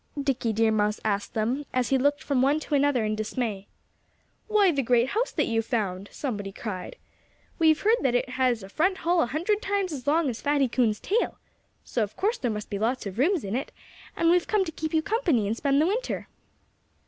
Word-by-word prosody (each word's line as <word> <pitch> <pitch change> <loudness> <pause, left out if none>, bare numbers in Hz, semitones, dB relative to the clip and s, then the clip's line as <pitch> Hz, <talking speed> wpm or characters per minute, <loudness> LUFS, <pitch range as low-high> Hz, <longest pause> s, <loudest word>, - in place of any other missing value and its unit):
Dickie 265 -4 0
Deer 220 +1 +2
Mouse 210 0 +1
asked 205 -1 -1
them 235 +6 0
as 255 -2 0
he 270 - +3
looked 285 +2 +1
from 275 -3 +1
one 280 +4 +3
to 300 - -6
another 280 -4 +3
in 215 - 0
dismay. 215 -2 -3 0.8
"Why, 420 -4 +4
the 280 -3 0
great 245 0 +2
house 455 - 0
that - - 0
you've 225 -1 -1
found!" 200 -5 -2
somebody 205 -8 -4
cried. 195 - -6 0.6
"We've 315 -1 +4
heard 445 +3 +3
that 260 -3 +1
it 245 - 0
has 250 -4 0
a 195 - -10
front 370 - +1
hall 345 0 +3
a - - +1
hundred 350 - 0
times 395 -6 -1
as 265 -3 -7
long 315 +1 +3
as 235 -3 -3
Fatty 285 -2 +2
Coon's 230 -3 +1
tail. 455 +5 -1 0.5
So 240 - -2
of 210 -1 -2
course 435 +5 0
there 245 - -1
must 210 -1 -5
be 200 - -2
lots 235 +3 -1
of 200 +2 -6
rooms 340 +5 +2
in 200 +2 -3
it; 265 - -3 0.5
and 335 0 +3
we've 355 0 +3
come 415 -3 +2
to 325 - -5
keep 315 0 -4
you 315 -1 +1
company 360 - +1
and 210 +3 -1
spend 275 +3 +1
the 310 - +4
winter." 445 +8 -2
265 Hz, 220 wpm, -26 LUFS, 220-325 Hz, 0.8 s, Why